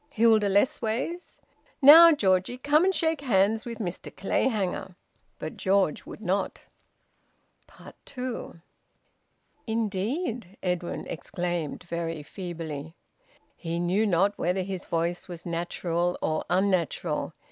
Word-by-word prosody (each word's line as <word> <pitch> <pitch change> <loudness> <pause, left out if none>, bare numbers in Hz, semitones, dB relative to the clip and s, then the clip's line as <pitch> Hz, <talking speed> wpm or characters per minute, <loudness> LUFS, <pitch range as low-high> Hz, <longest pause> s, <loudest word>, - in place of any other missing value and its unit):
Hilda 225 -5 +4
Lessways? 245 - -1 0.4
Now, 320 +4 +10
Georgie, 195 - +1
come 295 +6 +3
and 380 0 +2
shake 320 -3 +1
hands 220 -3 +2
with 230 -1 -5
Mr 185 -5 -5
Clayhanger." 195 -3 -1 0.4
But - - -7
George 190 -5 +1
would - - -9
not. 190 +2 0 1.5
TWO. 250 -9 -6 1.1
"Indeed!" 220 - -2
Edwin 180 -2 -2
exclaimed, 175 0 -4
very 170 -2 -4
feebly. 165 -3 -7 0.6
He 165 -1 -4
knew 185 +5 +1
not 195 +2 +2
whether 180 +2 0
his 190 -1 -5
voice 170 +1 -2
was 175 -2 -9
natural 170 0 -1
or 155 0 -1
unnatural. 185 -4 0
190 Hz, 105 wpm, -27 LUFS, 175-230 Hz, 1.5 s, Now